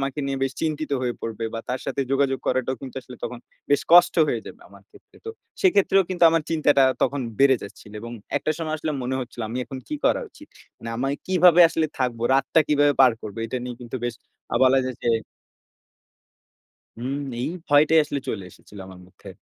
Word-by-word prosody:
আমাকে 135 +1 -3
নিয়ে 135 0 -2
বেশ 135 0 0
চিন্তিত 155 -1 -2
হয়ে 120 -1 -1
পড়বে 115 0 -4
বা 115 - -3
তার 125 +1 -2
সাথে - - -2
যোগাযোগ 135 -1 +1
করাটাও 130 +1 0
কিন্তু 135 -2 -9
আসলে 125 -1 -12
তখন 125 - -5 0.3
বেশ 145 - +3
কষ্ট 175 0 +7
হয়ে 120 - -1
যাবে - - -11
আমার - - -17
ক্ষেত্রে। 405 -1 -21
তো - - -3 0.3
সেক্ষেত্রেও 200 - +4
কিন্তু 180 -2 +2
আমার 165 -1 +1
চিন্তাটা 150 -4 +3 0.2
তখন 140 - 0 0.2
বেড়ে 135 -1 +5
যাচ্ছিলো 105 +1 -12
এবং 115 +1 -8 0.3
একটা 145 - -2
সময় 155 -2 -3
আসলে 155 0 -3
মনে 130 +1 -2
হচ্ছিলো 120 -1 -7
আমি 120 +3 -4
এখন 130 +3 -8
কি - - -3
করা - - +3
উচিত? 300 - -16 0.3
মানে 115 - -7
আমি 130 +3 -1 0.2
কিভাবে 180 -1 +5
আসলে 160 -1 0
থাকব, 125 -3 -1 0.2
রাতটা 135 +4 +3
কিভাবে 145 -1 +4
পার 130 -2 +7
করবো 105 0 -8
এটা 125 +3 -3
নিয়ে 125 -1 -6
কিন্তু 120 +1 -6
বেশ 120 -1 -2 0.4
অ - - +3
বলা 130 +1 +5
যায় 130 -2 -4
যে - - 0 1.9
হুম। 130 +4 -3 0.2
এই - - -1 0.2
ভয়টাই 150 +2 +5
আসলে 145 -1 -4
চলে 95 - -3
এসেছিল 105 - -16
আমার 95 -1 -12
মধ্যে। 95 - -16
135 Hz, 200 wpm, -23 LUFS, 125-155 Hz, 1.9 s, কষ্ট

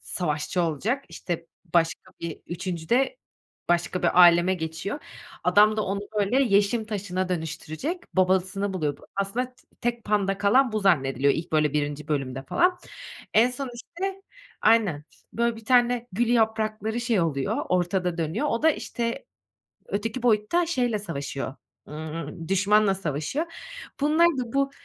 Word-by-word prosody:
savaşçı 175 +1 -1
olacak, 200 - -1
işte, 170 -2 -5 0.3
başka 165 -1 +1
bir 170 -2 -5
3'üncüde 185 - -1 0.5
başka 175 +1 +1
bir - - +2
âleme 175 +1 +7
geçiyor. 160 - -4 0.5
Adam 215 +1 +5
da 215 - +1
onu 200 +1 -2 0.2
böyle 240 +7 +3
yeşim 210 0 +2
taşına 185 -3 -2
dönüştürecek, 175 - -4
babasını 190 +2 +2
buluyor 150 -5 -1
bu. - - -17
Aslında 200 +6 -1
t - - -25 0.2
tek 240 -1 -2
panda 200 -2 +1
kalan 225 +5 +4
bu 215 - 0
zannediliyor, 140 -7 +3
ilk 160 0 -5
böyle 150 -2 +3
1'inci 145 0 -2
bölümde 135 -3 -2
falan. 360 - +2 0.6
En 230 +3 +5
son 255 0 -5
işte 380 +10 -5 0.4
Aynen, 205 -10 +3 0.3
böyle 235 0 0
bir 225 - -12
tane 245 0 +3
gül 235 +5 +1
yaprakları 220 -1 +1
şey 235 -5 +1
oluyor, 140 -5 0
ortada 180 -1 0
dönüyor. 165 - -1
O 230 - -1
da 320 - +6
işte, 235 - -3 0.6
öteki 225 +4 -3
boyutta 245 +9 +2
şeyle 245 -9 0
savaşıyor, 140 -7 -4 0.3
ımm, 160 +1 -6
düşmanla 200 +1 +3
savaşıyor. 185 - -2 0.5
Bunlar 310 +4 +4
da 255 -8 -1
bu 275 0 +1
200 Hz, 140 wpm, -26 LUFS, 165-240 Hz, 0.6 s, âleme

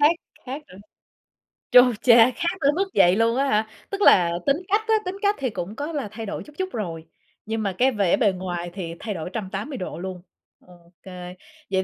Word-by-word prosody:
Khác 295 +3 +6 0.3
khác 275 +4 -5
rồi. 185 +2 -13 0.9
Chu 250 -1 +7
cha! 235 0 +7
Khác 345 +3 -2
tới 285 0 +4
mức 390 +2 0
vậy 175 +2 +5
luôn 230 +2 +2
á 275 - +2
hả? 215 +1 +1 0.2
Tức 400 +1 -4
là 175 - +6
tính 280 +1 +3
cách 415 +3 +2
á, 445 - +3
tính 365 +2 -3
cách 410 0 +2
thì 260 -2 -1
cũng 200 +1 -6
có 290 +5 -4
là 285 -8 -3
thay 225 +1 -6
đổi 205 - -5
chút 295 - -16
chút 375 0 -2
rồi, 165 -7 -5 0.4
nhưng 220 0 -2
mà 195 -2 -2
cái 265 +2 +4
vẻ 200 0 +2
bề 215 -7 +3
ngoài 175 -2 -4
thì 170 -4 -5
thay 215 -2 -4
đổi 170 0 -5
180 215 +5 -4
độ 180 - -6
luôn. 185 -1 -6 0.4
Ô 175 -1 -20
kê. 180 -1 -9 0.4
Vậy 190 0 +1
220 Hz, 220 wpm, -24 LUFS, 185-280 Hz, 0.9 s, Chu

